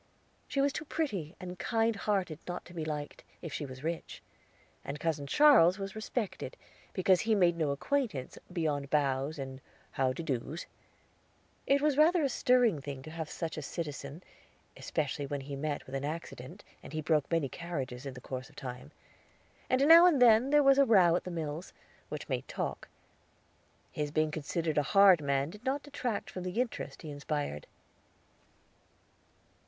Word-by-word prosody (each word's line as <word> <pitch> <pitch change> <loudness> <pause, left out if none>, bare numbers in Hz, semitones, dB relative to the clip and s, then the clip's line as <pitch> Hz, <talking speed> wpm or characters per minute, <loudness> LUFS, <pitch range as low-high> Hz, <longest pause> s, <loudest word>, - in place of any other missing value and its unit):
She 275 - 0
was 280 0 +2
too 315 - -5
pretty 200 - -3
and 180 0 -7
kind 225 -1 +1
hearted 195 -6 -1
not 175 0 -5
to 175 - -13
be 165 -2 -4
liked, 150 -1 -5 0.2
if 165 - -6
she 145 - -4
was 130 +1 -10
rich; 165 +1 -4 0.6
and 145 +2 -5
Cousin 155 -4 -1
Charles 215 - +6
was 195 -1 -5
respected, 220 -1 -4 0.3
because 185 -1 +3
he 225 -1 +2
made 175 -4 +4
no 160 -3 0
acquaintance 160 - -2
beyond 150 -5 -1
bows, 140 +1 +1
and 135 -1 -6 0.3
"How 130 -1 +1
de 130 +6 -5
do's." 145 +2 -3 1.0
It 280 +1 +3
was 300 -2 +2
rather 330 +2 +5
a 280 - +2
stirring 245 - +3
thing 135 -1 -7
to 155 - -9
have 160 -2 -5
such 165 -1 -4
a - - -3
citizen, 150 0 -6 0.5
especially 145 -2 -2
when 140 0 -3
he 140 +1 -6
met 145 +1 -3
with 130 - -12
an 135 0 -2
accident, 145 -4 -6 0.2
and - - -11
he 155 - -2
broke 150 -2 +1
many 165 -4 +1
carriages 135 -6 -5
in 135 - -6
the 125 - -9
course 130 0 -6
of - - -21
time; 130 +1 -7 0.8
and 265 +3 +3
now 335 +2 +10
and 315 -6 +4
then 240 +1 +6
there 295 0 +5
was 275 0 +6
a - - +8
row 185 -8 +5
at - - -2
the - - -4
mills, 160 0 -5 0.4
which - - -6
made - - -3
talk. - - -4 1.0
His 150 -4 -2
being 155 +1 +1
considered 155 +1 -1
a 145 +5 -2
hard 195 -5 +8
man 140 +1 0
did 210 +4 -13
not 275 +2 -1
detract 255 -7 -3
from 185 - -6
the 180 +5 -3
interest 250 -7 -3
he 155 - -6
inspired. 145 - -4
165 Hz, 175 wpm, -31 LUFS, 145-215 Hz, 1.0 s, now